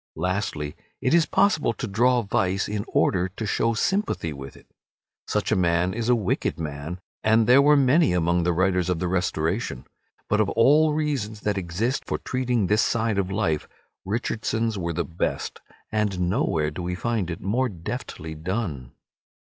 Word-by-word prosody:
Lastly, 90 -6 -2 0.2
it 130 - +1
is 170 -2 +4
possible 200 - +2
to 125 - -5
draw 120 +4 +2
vice 95 -1 0
in 105 -1 -3
order 90 0 +1
to 100 +4 -6
show 115 +2 +1
sympathy 190 - 0
with 70 -1 -9
it. - - -18 0.6
Such 105 0 -1
a - - +4
man 90 0 +2
is 115 +1 -2
a 125 - +6
wicked 105 -6 -1
man, 75 +3 -5 0.2
and 110 +1 +4
there 125 +4 +7
were 145 +1 +5
many 140 - +4
among 85 0 +2
the 90 +1 +1
writers 90 0 +1
of 90 - +1
the 90 - -2
Restoration. 85 - -1 0.4
But 105 0 +2
of 105 - +1
all 150 +6 +4
reasons 130 -9 -2
that 105 -1 0
exist 95 +9 -2
for - - -1
treating 125 -4 -1
this 105 +3 +3
side 110 -2 +1
of 95 -1 -1
life, 95 -7 0 0.4
Richardson's 110 +2 -1
were 85 -3 -2
the 85 +1 -1
best, 85 0 -3 0.3
and 105 -4 0
nowhere 80 - 0
do 80 - -6
we 90 +1 -2
find 110 -2 -1
it 85 - -4
more 125 +7 0
deftly 85 -3 -6
done. 80 - -4
100 Hz, 170 wpm, -25 LUFS, 85-115 Hz, 0.6 s, there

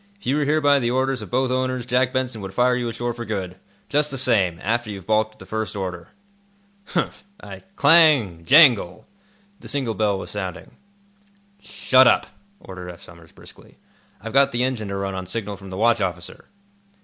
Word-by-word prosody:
If - - -19
you 135 - +1
were 150 - 0
here 155 +2 +1
by 145 -1 +4
the 120 -2 -1
orders 130 0 -1
of 105 - -9
both 130 0 0
owners, 130 -1 -1
Jack 125 +1 +1
Benson 130 -4 -3
would 95 0 -8
fire 125 0 +3
you 120 -1 -2
ashore 120 +1 -4
for 120 0 -7
good, 95 -5 -5 0.3
just 150 +1 +1
the 135 - -5
same, 100 -9 +2
after 115 +2 -1
you've 100 -3 -8
balked 110 0 +1
at - - -26
the - - -13
first 110 -1 -4
order." 90 -3 -5 0.8
"Humph! 170 - -3 0.2
I—" - - -10
Clang! 145 - +4
Jangle! 120 - +5 0.5
The - - -12
signal 130 -6 -2
bell 105 -1 0
was - - -8
sounding. 95 -3 -6 0.9
"Shut 130 -1 +3
up," - - +3 0.3
ordered 90 - -10
Eph 85 -1 -12
Somers, 85 -2 -16
briskly. - - -17 0.4
"I've 115 +1 -8
got 140 0 +4
the 120 +1 -1
engine 125 -5 -2
to 100 - -4
run 100 0 -3
on 95 -1 -6
signal 105 +1 -4
from 100 -1 -12
the 95 - -7
watch 115 +1 +2
officer." 90 -1 -5
115 Hz, 195 wpm, -22 LUFS, 95-130 Hz, 0.9 s, Jangle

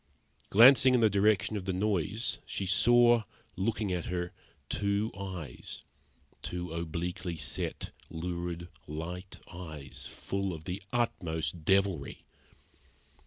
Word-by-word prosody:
Glancing 130 +4 +8
in - - +4
the 110 -2 +5
direction 100 +1 +3
of 100 -3 -3
the 95 - -1
noise, 100 +2 0
she 100 - -3
saw, 120 +5 +6 0.3
looking 105 +1 -1
at 90 -2 -2
her, 90 -1 -2 0.4
two 100 +2 0
eyes 90 -9 -6 0.6
two 90 -2 -4
obliquely 85 +1 -3
set, 75 -1 -3 0.2
lurid, 85 +1 -4 0.2
light 90 +5 -6
eyes, 80 -6 -7
full 100 -1 -3
of 80 -1 -8
the 90 +4 -4
utmost 80 -9 -1
devilry. 95 -6 +1
90 Hz, 115 wpm, -31 LUFS, 85-100 Hz, 0.6 s, Glancing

